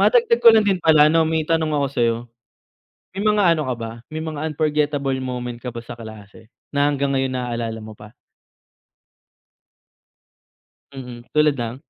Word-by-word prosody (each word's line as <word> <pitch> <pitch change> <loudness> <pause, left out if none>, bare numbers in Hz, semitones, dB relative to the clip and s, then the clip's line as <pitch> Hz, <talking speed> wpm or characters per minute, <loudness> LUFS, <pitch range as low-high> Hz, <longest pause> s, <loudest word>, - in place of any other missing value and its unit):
Madagdag 470 -1 +3
ko 230 - +10
lang 220 -2 +4
din 190 -3 +1
pala 155 -2 +6
'no, 165 +2 +3
may 160 -1 -1
tanong 160 -1 +1
ako 145 -2 +1
sa'yo. 115 -1 +2 1.0
May 195 - -3
mga 210 -1 +2
ano 155 - -2
ka 125 - 0
ba, 115 -1 -5 0.2
may 155 - -5
mga 155 -2 -5
unforgettable 150 -3 0
moment 125 -2 -5
ka 125 - -4
ba 120 - -8
sa 120 - -8
klase, 110 -1 -12 0.2
na 145 +1 +3
hanggang 140 -1 -1
ngayon 135 -1 0
naalala 115 -2 -4
mo 110 0 -10
pa? 105 0 -14 2.8
Mhm, 125 -2 -9
tulad 150 -1 +4
ng? 120 0 -4
140 Hz, 160 wpm, -21 LUFS, 120-155 Hz, 2.8 s, ko